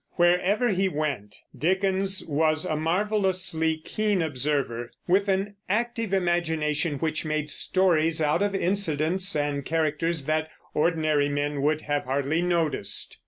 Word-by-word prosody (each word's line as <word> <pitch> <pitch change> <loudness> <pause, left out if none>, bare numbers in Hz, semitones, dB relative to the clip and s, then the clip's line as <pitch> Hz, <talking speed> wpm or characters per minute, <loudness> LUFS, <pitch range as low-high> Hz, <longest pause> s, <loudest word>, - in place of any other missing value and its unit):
Wherever 180 +7 +2
he 190 -1 +1
went, 145 - -3 0.2
Dickens 190 +2 +1
was 155 +1 +1
a 155 - -1
marvelously 180 -1 0
keen 205 +3 -1
observer, 135 -5 -1 0.2
with 195 +3 +3
an 195 +1 -1
active 230 0 -1
imagination 165 -5 0
which 160 +1 -2
made 155 -1 -2
stories 165 -2 +2
out 155 +3 +1
of 205 -1 0
incidents 185 -1 0
and 145 -1 -1
characters 160 0 -1
that 155 +1 0 0.2
ordinary 155 -2 +1
men 145 0 -2
would 150 +2 +1
have 145 -2 -2
hardly 140 +5 0
noticed. 165 - 0
160 Hz, 125 wpm, -26 LUFS, 150-190 Hz, 0.2 s, with